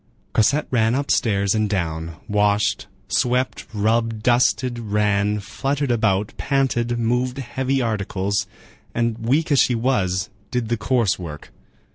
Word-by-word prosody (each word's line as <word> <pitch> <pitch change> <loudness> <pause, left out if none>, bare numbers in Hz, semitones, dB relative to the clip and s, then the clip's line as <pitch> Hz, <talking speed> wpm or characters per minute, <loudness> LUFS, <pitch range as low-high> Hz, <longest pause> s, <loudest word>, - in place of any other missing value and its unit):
Cosette 140 +7 +3
ran 115 -1 +2
upstairs 105 -8 +1
and 110 -1 +1
down, 80 -4 -2
washed, 105 0 +1 0.2
swept, 125 +1 0
rubbed, 110 +1 0
dusted, 120 0 +2
ran, 105 -1 +1
fluttered 135 +7 -2
about, 105 -3 +1
panted, 120 -4 0
moved 125 +2 0
heavy 130 +1 -1
articles, 100 -2 -1 0.5
and 115 -1 0
weak 140 +8 +1
as 140 - +5
she 125 - +3
was, 100 -6 0 0.2
did 120 -3 -2
the 120 - +1
coarse 110 -2 +1
work. 75 -4 -8
115 Hz, 125 wpm, -22 LUFS, 100-125 Hz, 0.5 s, as